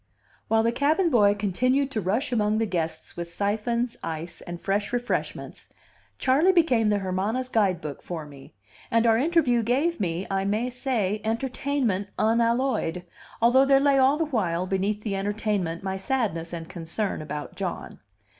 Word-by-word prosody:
While 225 0 +3
the 230 - +2
cabin 310 +8 +2
boy 205 -5 +5
continued 255 +8 +1
to 220 - -1
rush 220 +9 -1
among 215 -2 +1
the 225 - +1
guests 170 -5 -3
with 170 0 -5
siphons, 225 +5 -1
ice, 165 +1 -5
and 175 0 -6
fresh 200 +2 -1
refreshments, 245 0 -3 0.5
Charley 285 +8 +4
became 260 - +3
the 205 - +2
Hermana's 200 +7 -2
guidebook 185 - 0
for 165 -3 -6
me; 140 -5 -14 0.3
and 230 0 +2
our 225 -1 +4
interview 280 -5 +3
gave 270 +9 0
me, 180 -1 -2
I 195 0 -1
may 215 +5 -1
say, 225 -5 -1
entertainment 230 -2 -1
unalloyed, 230 -5 +1 0.4
although 250 +3 +6
there 275 0 +5
lay 280 -1 +4
all 265 +3 +4
the 325 - +1
while, 185 - -1
beneath 195 +3 -1
the 205 -3 -2
entertainment, 200 -4 -2
my 190 0 -2
sadness 190 -7 -2
and 165 -1 -6
concern 175 +3 -3
about 150 -1 -6
John. - - -5
215 Hz, 155 wpm, -26 LUFS, 190-255 Hz, 0.5 s, although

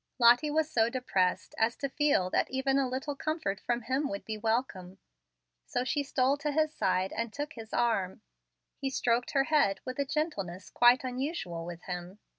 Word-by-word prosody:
Lottie 245 +5 +6
was 310 +1 +1
so 230 -7 +2
depressed 195 -8 0
as 225 +2 +2
to 275 - -3
feel 275 -10 +1
that - - +1
even 270 +1 +1
a 265 -2 +1
little 265 +3 -3
comfort 310 - -2
from 240 +2 -2
him 265 +5 0
would 300 0 -5
be 220 - -3
welcome; 215 -4 -2 0.7
so 245 - -2
she 285 +3 0
stole 270 0 +1
to 295 0 -2
his 310 +1 +1
side 185 -4 0
and 230 -1 -3
took 290 +5 -5
his 225 -2 -10
arm. 220 -6 0 0.6
He 270 - -1
stroked 245 -2 0
her 275 - +4
head 280 -10 +2
with 255 +1 -5
a 280 - +2
gentleness 210 - -3
quite 245 +2 +5
unusual 250 - -3
with 175 0 -8
him. 180 +1 -6
250 Hz, 185 wpm, -30 LUFS, 200-285 Hz, 0.7 s, Lottie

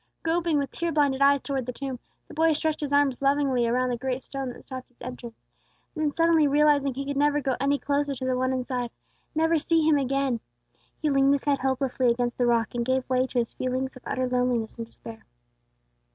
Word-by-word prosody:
Groping 330 -1 +1
with 280 -2 -1
tear 340 0 -2
blinded 285 -3 +1
eyes 280 0 +4
towards 270 -3 -3
the - - -2
tomb, 265 0 -5 0.3
the - - -12
boy 320 +1 +3
stretched 310 +1 -1
his 290 -2 -3
arms 285 -3 +2
lovingly 275 -3 +2
around 250 +2 +1
the 245 - -1
great 260 +1 -3
stone 270 -2 -5
that 245 - -10
stopped 260 -1 -8
its 245 - -36
entrance; 240 -2 -8 0.6
then 310 -2 0
suddenly 330 -2 +4
realizing 290 -1 +3
that 255 - -11
he 275 - -3
could 285 0 -3
never 295 +1 +3
go 270 -2 -1
any 280 +1 +2
closer 285 0 -1
to 260 0 -5
the 255 0 +1
One 260 +1 0
inside, 250 -1 -2 0.5
never 325 +1 +3
see 320 0 +2
Him 300 -2 +4
again, 270 -2 0 0.6
he 305 - +2
leaned 275 0 +4
his 280 - -4
head 285 -1 +1
hopelessly 260 -1 +1
against 240 +1 -1
the 245 - +3
rock, 230 -2 +1
and 240 -1 -1
gave 260 +1 0
way 255 0 +2
to 255 - -5
his 235 -1 0
feeling 255 +1 -1
of 255 - -12
utter 255 0 -1
loneliness 250 -3 0
and 230 -1 -5
despair. 225 -1 -11
270 Hz, 220 wpm, -26 LUFS, 250-290 Hz, 0.6 s, eyes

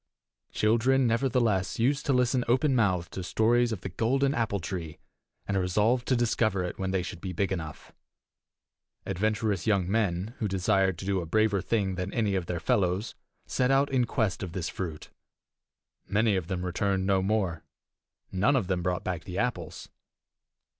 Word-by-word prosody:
Children, 120 +5 +2
nevertheless, 115 -5 +1
used 135 +6 +1
to - - +3
listen 125 0 +2
openmouthed 115 - +2
to 95 - -5
stories 115 +5 +2
of 105 -5 -4
the 95 - -5
golden 135 +9 +1
apple 110 -5 0
tree, 85 -3 -5 0.5
and 100 - -1
resolved 105 +7 +1
to 130 - +3
discover 110 -5 +1
it 90 - -5
when 95 0 -1
they 95 -1 0
should 90 -1 -7
be 95 -2 -4
big 100 +3 -1
enough. 80 -5 -5 1.1
Adventurous 105 0 -1
young 100 -5 +2
men, 100 0 0
who 110 - 0
desired 95 -1 +1
to 95 - -7
do 95 -2 0
a 85 - -6
braver 110 +1 +2
thing 100 -3 0
than 90 +1 -3
any 110 -4 +1
of 95 -3 -1
their 85 - -2
fellows, 90 +4 0 0.3
set 125 -1 0
out 135 +1 +3
in 130 -2 +2
quest 110 -5 -1
of 90 -4 -5
this 90 -4 -3
fruit. 80 -5 -6 1.0
Many 110 0 +2
of 90 -3 -2
them 90 -1 -3
returned 95 +2 0
no 95 -1 +2
more: 95 -5 -1 0.7
none 105 +10 +2
of 120 -7 +1
them 90 -1 -1
brought 90 +1 -1
back 90 -2 -4
the 90 -1 -6
apples. 110 -9 -3
100 Hz, 170 wpm, -28 LUFS, 90-115 Hz, 1.1 s, to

